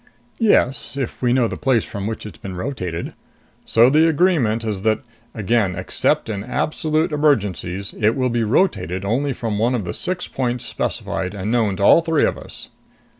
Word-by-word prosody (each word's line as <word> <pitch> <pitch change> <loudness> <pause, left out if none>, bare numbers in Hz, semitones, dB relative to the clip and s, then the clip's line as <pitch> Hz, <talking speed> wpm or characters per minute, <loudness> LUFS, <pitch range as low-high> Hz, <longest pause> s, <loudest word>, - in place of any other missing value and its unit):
"Yes. 140 - +2
If 135 -3 -4
we 125 -1 +2
know 125 -2 +3
the - - -5
place 130 -6 +2
from 100 0 -5
which 110 -1 -5
it's 105 -7 -10
been 95 -2 -7
rotated. 90 -6 -4 0.5
So 115 +1 +5
the 155 +5 +4
agreement 145 -10 +2
is 105 -3 -3
that 110 +1 +1 0.3
again 110 -3 +1
except - - 0
in 100 -3 -4
absolute 155 +5 -1
emergencies 100 - 0
it 110 +1 +2
will 130 -2 0
be 120 -1 0
rotated 100 - 0
only 135 +7 0
from 115 -4 -3
one 120 +3 +2
of 110 -6 -2
the 85 - -4
six 180 0 -2
points 125 -2 -2
specified 95 +2 -3
and 100 +2 -3
known 110 -5 +1
to 100 - -3
all 165 - +7
three 165 -2 +2
of - - 0
us." - - -10
115 Hz, 180 wpm, -20 LUFS, 100-140 Hz, 0.5 s, all